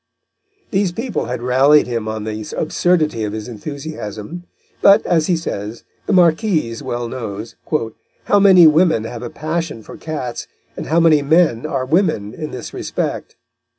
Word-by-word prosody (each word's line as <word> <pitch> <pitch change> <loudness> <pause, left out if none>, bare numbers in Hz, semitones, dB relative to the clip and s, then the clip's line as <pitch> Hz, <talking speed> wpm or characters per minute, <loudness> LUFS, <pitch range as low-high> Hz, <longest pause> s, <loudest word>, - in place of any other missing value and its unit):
These 195 -3 +1
people 230 +2 -3
had 120 0 -4
rallied 135 +4 +4
him 115 -3 -3
on 110 -1 -4
the 110 0 -5
absurdity 155 -7 +1
of 105 -1 -3
his 110 -1 -5
enthusiasm; 140 - -7 0.4
but, 200 - +6
as 165 -3 +2
he 175 - +2
says, 110 -8 -5 0.2
the - - 0
Marquise 170 - +2
well 120 0 -3
knows, 110 -2 -6 0.7
"how 205 - +3
many 190 -4 +7
women 160 -6 +4
have 115 0 -7
a 120 - -5
passion 155 -6 -4
for - - -11
cats, 140 -7 -5 0.3
and - - -6
how 165 +2 +2
many 160 -3 +5
men 155 -4 +2
are 135 -4 -2
women 150 - 0
in 155 +3 -6
this 125 - -8
respect." - - -4
150 Hz, 155 wpm, -18 LUFS, 115-170 Hz, 0.7 s, many